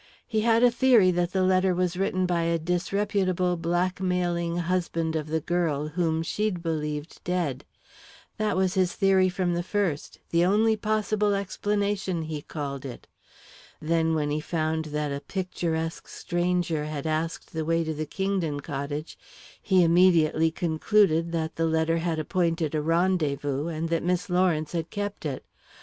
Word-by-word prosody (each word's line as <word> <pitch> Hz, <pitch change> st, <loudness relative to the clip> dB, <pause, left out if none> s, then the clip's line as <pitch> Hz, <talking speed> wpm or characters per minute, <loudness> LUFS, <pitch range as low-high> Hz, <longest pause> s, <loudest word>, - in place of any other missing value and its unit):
He 220 Hz, -2 st, 0 dB
had 230 Hz, +1 st, +3 dB
a 245 Hz, -, +6 dB
theory 235 Hz, -7 st, +5 dB
that 175 Hz, 0 st, 0 dB
the 190 Hz, 0 st, +1 dB
letter 185 Hz, 0 st, +3 dB
was 180 Hz, 0 st, 0 dB
written 185 Hz, 0 st, 0 dB
by 175 Hz, -1 st, +1 dB
a 165 Hz, 0 st, +1 dB
disreputable, 180 Hz, +1 st, 0 dB
blackmailing 175 Hz, 0 st, -1 dB
husband 170 Hz, -2 st, -1 dB
of 155 Hz, -1 st, -2 dB
the 160 Hz, +1 st, -1 dB
girl, 155 Hz, -3 st, -1 dB
whom 165 Hz, 0 st, 0 dB
she'd 195 Hz, 0 st, -2 dB
believed 150 Hz, -1 st, -4 dB
dead. 165 Hz, -7 st, -2 dB, 0.7 s
That 215 Hz, -4 st, 0 dB
was 190 Hz, -1 st, +2 dB
his 185 Hz, -2 st, +1 dB
theory 190 Hz, -1 st, +4 dB
from 180 Hz, -1 st, -1 dB
the 170 Hz, -, 0 dB
first 180 Hz, -5 st, -2 dB
the 170 Hz, 0 st, +3 dB
only 215 Hz, +4 st, +3 dB
possible 210 Hz, -1 st, 0 dB
explanation, 200 Hz, -2 st, -1 dB
he 155 Hz, -2 st, -5 dB
called 140 Hz, -3 st, -5 dB
it. 130 Hz, -3 st, -8 dB, 0.7 s
Then, 160 Hz, 0 st, +1 dB
when 150 Hz, -1 st, 0 dB
he 150 Hz, -, 0 dB
found 160 Hz, 0 st, -1 dB
that 150 Hz, -1 st, -2 dB
a 140 Hz, -, -3 dB
picturesque 165 Hz, -3 st, -3 dB
stranger 175 Hz, -3 st, -1 dB
had 150 Hz, -1 st, -5 dB
asked 160 Hz, +1 st, -2 dB
the 160 Hz, -1 st, -2 dB
way 165 Hz, +1 st, +1 dB
to 160 Hz, 0 st, -3 dB
the 155 Hz, 0 st, -4 dB
Kingdon 190 Hz, -4 st, -1 dB
cottage, 145 Hz, +1 st, -5 dB, 0.4 s
he 190 Hz, -3 st, +4 dB
immediately 165 Hz, -2 st, +4 dB
concluded 165 Hz, +1 st, +2 dB
that 160 Hz, -1 st, -2 dB
the 165 Hz, 0 st, +1 dB
letter 160 Hz, +1 st, +1 dB
had 165 Hz, -1 st, -1 dB
appointed 165 Hz, -1 st, 0 dB
a 155 Hz, -, 0 dB
rendezvous, 150 Hz, -4 st, 0 dB
and 165 Hz, 0 st, -3 dB
that 165 Hz, -1 st, +1 dB
Miss 180 Hz, +1 st, -1 dB
Lawrence 175 Hz, -4 st, +1 dB
had 165 Hz, -2 st, -3 dB
kept 205 Hz, -5 st, -4 dB
it. 135 Hz, -3 st, -5 dB
170 Hz, 160 wpm, -26 LUFS, 160-185 Hz, 0.7 s, a